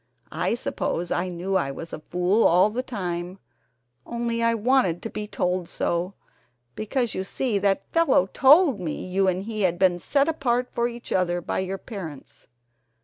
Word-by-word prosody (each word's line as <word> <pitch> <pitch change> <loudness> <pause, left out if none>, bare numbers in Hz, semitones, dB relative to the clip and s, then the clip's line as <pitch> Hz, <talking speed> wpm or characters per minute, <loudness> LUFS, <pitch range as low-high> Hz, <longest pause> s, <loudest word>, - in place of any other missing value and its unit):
I - - 0
suppose 175 -7 -3
I 180 - 0
knew 180 +2 -3
I 140 -7 +1
was 165 +4 -7
a - - -5
fool 180 +7 +1
all 180 +5 +5
the 245 +4 -2
time, 180 -6 -4 0.7
only 235 -1 -2
I 230 0 +3
wanted 225 -7 +2
to 225 - -5
be 210 0 -5
told 180 -3 -1
so, 175 +3 -1 0.6
because 235 - -2
you 190 - -2
see 215 +2 -1
that 195 0 +1
fellow 330 - +4
told 275 - +5
me 165 -4 -4
you 190 +1 +1
and 185 +1 0
he 215 0 -4
had 175 -3 +2
been 180 -1 +3
set 280 - +1
apart 250 -6 0
for 235 0 +1
each 240 0 -9
other 175 -1 +1
by 175 - -3
your 190 +1 -3
parents 180 - -9
195 Hz, 175 wpm, -25 LUFS, 180-235 Hz, 0.7 s, all